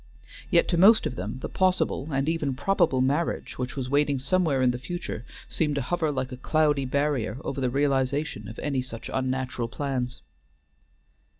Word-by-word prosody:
Yet - - +4
to 170 - +1
most 215 +5 +7
of 125 - -2
them 105 +5 -4
the - - -1
possible 185 -6 +1
and 135 +1 0
even 155 -5 0
probable 145 -4 +2
marriage 145 +3 -1
which 125 -1 -3
was 130 -3 -3
waiting 145 +1 +2
somewhere 140 -1 +1
in 125 - +4
the 125 - -4
future 130 -4 -5 0.2
seemed 150 -3 0
to 140 - 0
hover 160 +2 0
like 130 -2 -3
a 125 - -6
cloudy 150 0 +2
barrier 135 -4 0
over 135 - -3
the 130 - +1
realization 135 -2 0
of 110 - -9
any 140 -3 -1
such 115 -3 -7
unnatural 130 -2 -1
plans. 125 - -3
135 Hz, 175 wpm, -26 LUFS, 130-150 Hz, 0.2 s, most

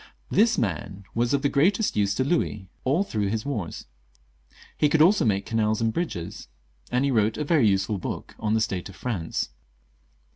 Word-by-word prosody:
This 225 +2 +4
man 100 -1 -2
was 120 +1 +1
of 140 -1 +1
the - - +4
greatest 185 +10 +2
use 100 -1 +1
to 130 - +1
Louis 130 - -1 0.2
all 145 +9 +3
through 105 - -2
his 110 +2 -2
wars; 110 - -4 0.9
he 150 - +3
could 160 - +2
also 180 - +5
make 100 -2 +1
canals 110 -1 +1
and 115 -1 +1
bridges; 105 - -4 0.4
and 125 +3 +2
he 140 - +1
wrote 110 -2 +2
a 150 - -1
very 145 -6 +3
useful 95 +1 +1
book - - -5
on 110 0 0
the 110 - +2
state 95 -3 -2
of 95 - -12
France. 95 -10 -3
115 Hz, 185 wpm, -25 LUFS, 100-140 Hz, 0.9 s, also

